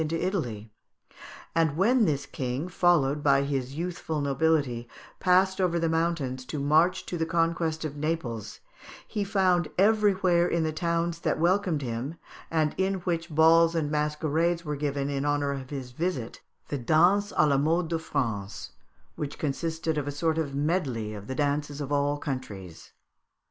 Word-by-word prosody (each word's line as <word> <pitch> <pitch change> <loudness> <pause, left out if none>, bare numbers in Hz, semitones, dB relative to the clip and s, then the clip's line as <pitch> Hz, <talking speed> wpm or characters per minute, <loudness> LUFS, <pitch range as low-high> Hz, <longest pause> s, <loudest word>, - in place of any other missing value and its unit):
into 160 +1 -1
Italy: 120 - -3 0.8
and 160 -3 +1
when 230 +5 +4
this 145 -5 0
king, 130 +5 -3
followed 165 -6 +2
by 140 -1 +4
his 135 -1 -3
youthful 165 -2 -3
nobility, 140 -4 0 0.3
passed 190 +1 +3
over 175 -2 +2
the 165 0 +1
mountains 160 -6 -1
to 150 - -6
march 155 +5 +2
to 175 - -4
the 160 - +1
conquest 165 -1 0
of 145 -2 -4
Naples, 145 -8 -3 0.5
he 205 - -2
found 185 -5 +2
everywhere 195 -4 +3
in 170 -2 0
the 155 0 -1
towns 170 +1 -1
that - - 0
welcomed 175 -2 +1
him, 125 +5 -4 0.3
and 155 -2 +1
in 190 +1 +1
which 170 -1 -2
balls 165 +2 +5
and 150 -3 0
masquerades 155 +3 0
were 150 -1 -2
given 140 -1 -2
in 140 -1 -2
honour 145 -1 +1
of 135 -2 -6
his 135 -3 -6
visit, 135 -4 -3 0.3
the 145 - -2
dance 175 - +3
à 155 - +4
la 140 -2 +3
mode 165 +4 +1
de 165 -1 -1
France, 110 -10 -3 0.4
which 145 -1 -5
consisted 160 +2 -2
of 145 - -4
a - - -1
sort 160 +2 0
of 140 -4 -3
medley 140 - -1
of 105 0 -8
the 130 - -4
dances 145 0 -1
of 145 -1 -5
all 145 0 +1
countries. 105 - -6
155 Hz, 165 wpm, -27 LUFS, 140-170 Hz, 0.8 s, balls